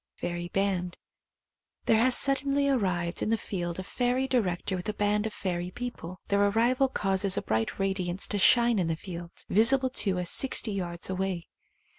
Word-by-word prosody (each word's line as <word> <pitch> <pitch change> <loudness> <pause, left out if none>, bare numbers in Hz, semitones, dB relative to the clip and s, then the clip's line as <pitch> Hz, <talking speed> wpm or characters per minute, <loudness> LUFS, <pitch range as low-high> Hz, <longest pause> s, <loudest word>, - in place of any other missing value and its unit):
Fairy 175 0 -4
Band. 185 -2 -1 0.9
There 220 - +4
has 250 +2 +3
suddenly 275 +1 +1
arrived 185 -10 0
in - - 0
the 225 - +2
field 175 -5 -4
a 185 - -4
fairy 250 +6 0
director 195 -7 0
with 180 +3 -4
a 210 - -3
band 210 +1 +1
of 215 - -7
fairy 175 -2 -3
people. 185 -6 -7
Their 200 0 +3
arrival 240 +6 +2
causes 195 -5 0
a - - +1
bright 110 0 -1
radiance 190 -1 0
to 205 - 0
shine 235 +1 +5
in 175 - 0
the 165 - 0
field, 175 0 -8 0.2
visible 255 +5 +3
to 195 -7 0
us 180 -1 +1
sixty 255 -4 +2
yards 175 -3 -3
away. 185 -2 -3
195 Hz, 175 wpm, -28 LUFS, 180-235 Hz, 0.9 s, shine